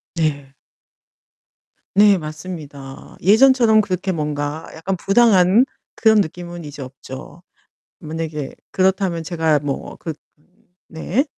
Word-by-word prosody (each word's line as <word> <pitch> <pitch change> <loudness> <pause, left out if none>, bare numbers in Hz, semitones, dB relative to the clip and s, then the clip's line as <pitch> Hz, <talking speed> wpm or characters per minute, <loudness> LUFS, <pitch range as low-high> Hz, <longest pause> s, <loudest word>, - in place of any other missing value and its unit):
네. 145 -4 -1 1.4
네 205 -1 +6
맞습니다. 155 -4 -9
예전처럼 225 +2 +5
그렇게 190 -1 -1
뭔가 150 0 -3
약간 185 +4 -3
부당한 200 +2 +4 0.3
그런 220 -2 +5
느낌은 175 -1 -5
이제 145 -1 -8
없죠. 130 +5 -10 0.6
만약에 155 -3 -5 0.2
그렇다면 185 -3 +1
제가 160 -3 +1
뭐 140 -1 -5
그 160 - -5 0.7
네. 185 - -1
170 Hz, 215 characters per minute, -20 LUFS, 150-195 Hz, 1.4 s, 네